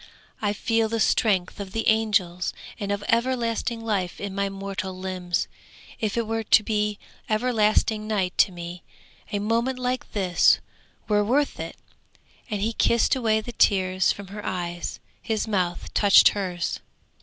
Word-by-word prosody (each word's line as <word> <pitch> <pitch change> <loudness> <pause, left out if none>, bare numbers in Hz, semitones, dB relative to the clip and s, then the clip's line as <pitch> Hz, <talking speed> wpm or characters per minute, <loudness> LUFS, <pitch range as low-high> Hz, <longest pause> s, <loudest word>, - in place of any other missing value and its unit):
I 205 -2 +1
feel 225 +2 0
the 230 0 -1
strength 205 -4 +2
of 195 -1 -6
the 225 - -1
angels 205 -5 +1 0.2
and 200 -2 -3
of 200 0 -2
everlasting 235 -1 0
life 195 -5 -1
in 200 -1 -4
my 200 0 -1
mortal 195 -1 -5
limbs! 185 -1 -2 0.5
If 215 0 -1
it 230 - +1
were 225 +1 -1
to 220 0 +5
be 210 -1 0 0.3
everlasting 215 -1 +2
night 190 -4 -1
to 195 - +5
me, 175 0 -7 0.5
a 205 - 0
moment 230 +5 0
like 255 0 -3
this 185 -4 +4 0.5
were 210 -1 +3
worth 275 +7 +1
it!' - - -6 0.7
and 205 -3 -2
he 225 +2 0
kissed 235 +2 +3
away 220 -4 +1
the 240 - -7
tears 185 -4 +3
from 200 -2 -7
her 205 +1 -7
eyes; 175 -1 -4 0.2
his 220 -1 -2
mouth 180 -5 -2
touched 200 -1 +7
hers. 180 -4 -3
210 Hz, 155 wpm, -25 LUFS, 190-225 Hz, 0.7 s, touched